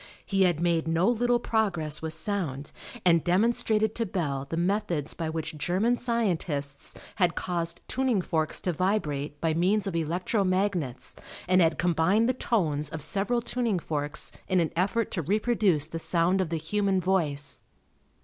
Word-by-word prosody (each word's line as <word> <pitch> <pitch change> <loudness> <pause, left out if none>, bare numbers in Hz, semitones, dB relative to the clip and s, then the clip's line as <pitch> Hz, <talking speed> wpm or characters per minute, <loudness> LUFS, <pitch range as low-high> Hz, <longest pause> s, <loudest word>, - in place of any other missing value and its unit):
He 195 -1 +3
had 175 -4 +1
made 170 -1 +1
no 165 +4 +2
little 240 +1 +2
progress 175 -11 0
with 160 0 -2
sound, 155 -10 -2 0.3
and 170 -3 +5
demonstrated 215 +3 +2
to 230 - -1
Bell 140 -7 -2
the 165 - -3
methods 175 -4 -1
by 165 -2 -3
which 160 -1 -4
German 195 +10 +1
scientists 175 - -2 0.2
had 180 -4 +2
caused 170 -1 -3
tuning 260 -5 +1
forks 160 -3 -1
to 180 - -1
vibrate 150 -6 -1
by 160 0 +1
means 185 +5 +2
of 195 -4 -3
electro 175 +6 0
magnets 185 -9 -1 0.3
and 185 0 +4
had 165 -1 +3
combined 175 +6 +2
the 255 - +2
tones 160 - 0
of 155 -2 -3
several 210 +7 0
tuning 235 -5 0
forks 150 -3 -3 0.2
in 185 - +2
an 165 -2 0
effort 200 +6 0
to 175 - -1
reproduce 200 -3 +1
the 165 +1 -6
sound 175 +3 +2
of 180 - -2
the 165 - -1
human 195 +4 0
voice. 150 -7 0
175 Hz, 160 wpm, -27 LUFS, 160-205 Hz, 0.3 s, and